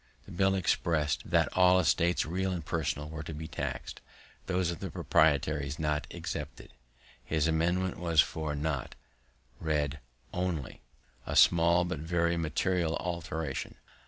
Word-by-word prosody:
The - - -12
bill 95 +2 +2
express'd 80 -5 0
"that - - +3
all 90 0 +6
estates, 85 0 +2
real 95 +4 -1
and 85 -4 -4
personal, 75 -2 -2
were 80 +1 -6
to 80 0 -7
be 80 +1 -6
taxed, - - -5 0.5
those 90 -2 +1
of 85 - -6
the - - -4
proprietaries 75 -2 +1
not 75 -1 -1
excepted." - - -6 0.5
His 80 -1 0
amendment 85 +3 0
was, 85 -3 +1
for 75 0 +2
not 75 -3 -3 0.6
read 75 -2 -1 0.3
only: 90 -9 -3 0.5
a - - -2
small, 85 +1 +5
but 90 -4 -3
very 85 +1 +1
material 85 +1 0
alteration. 80 -4 -4
80 Hz, 135 wpm, -30 LUFS, 75-90 Hz, 0.6 s, all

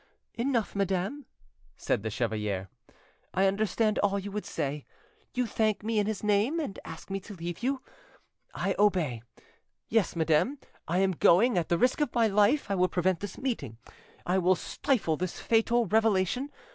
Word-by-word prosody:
"Enough, 235 -2 -1
madam," 195 +8 -1 0.5
said - - 0
the 110 - -3
chevalier; 105 -4 -2 0.7
"I 190 - +3
understand 215 +2 +1
all 200 -1 +2
you 200 +1 -5
would 210 +1 -4
say. 145 -2 -3 0.5
You 250 0 +1
thank 215 -1 0
me 220 0 0
in 205 - +1
his 215 -1 -3
name, 210 +10 +2
and 245 -11 -4
ask - - -9
me 195 - -1
to 205 +1 -10
leave 170 +1 -6
you: 265 +2 -1 0.7
I - - 0
obey 175 - +2 0.7
yes, 220 -6 +1
madame, 165 - +2 0.3
I 170 - 0
am 190 0 +3
going; 190 +7 +4
at 175 -3 0
the 170 - +3
risk 250 - +2
of 295 - -1
my 235 -1 +4
life 210 +4 +3
I - - +3
will 185 -1 +3
prevent 180 0 +1
this 205 0 -6
meeting, 185 - -3 0.5
I 185 +2 +2
will 185 +1 +4
stifle 185 - -1
this 185 +1 -4
fatal 230 +1 +2
revelation. 220 +4 +1
200 Hz, 170 wpm, -29 LUFS, 175-225 Hz, 0.7 s, going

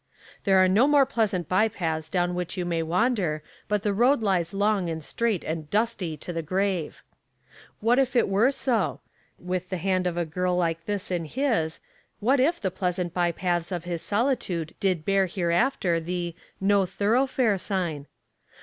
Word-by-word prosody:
"There 195 -2 +5
are 185 0 +6
no 210 +9 +4
more 290 -2 +5
pleasant 200 - -1
by 200 +4 +3
paths 160 -6 -3
down 175 -1 0
which 180 0 -4
you 180 - -1
may 170 -1 0
wander, 175 - 0 0.2
but 210 -1 0
the 205 - +1
road 240 +4 +3
lies 180 -5 +1
long 200 -2 +1
and 160 -1 -4
straight 225 +2 -1
and 155 -1 -4
dusty 205 -7 -1
to 175 - -6
the 165 - -2
grave." 185 0 -2 0.8
What 235 +4 +3
if 260 -1 +1
it 240 - +4
were 205 +6 +3
so? 245 -6 -1 0.4
With 180 0 -4
the 185 - -2
hand 185 0 0
of 175 -1 -2
a 175 - 0
girl 180 +3 -1
like 165 -1 -1
this 205 -3 -3
in 175 -2 -1
his, 220 - -1 0.4
what 255 +6 +3
if 320 +7 +2
the 190 -3 -2
pleasant 180 -2 -2
by 175 -1 +1
paths 175 0 -1
of 175 -2 -3
his 175 -2 -4
solitude 205 - -1
did 185 -5 0
bear 195 -1 +3
hereafter 175 +1 +1
the 175 +1 -3 0.3
"No 195 -1 +3
Thoroughfare" 220 +2 +1
sign? 170 -8 -2
185 Hz, 175 wpm, -26 LUFS, 170-215 Hz, 0.8 s, are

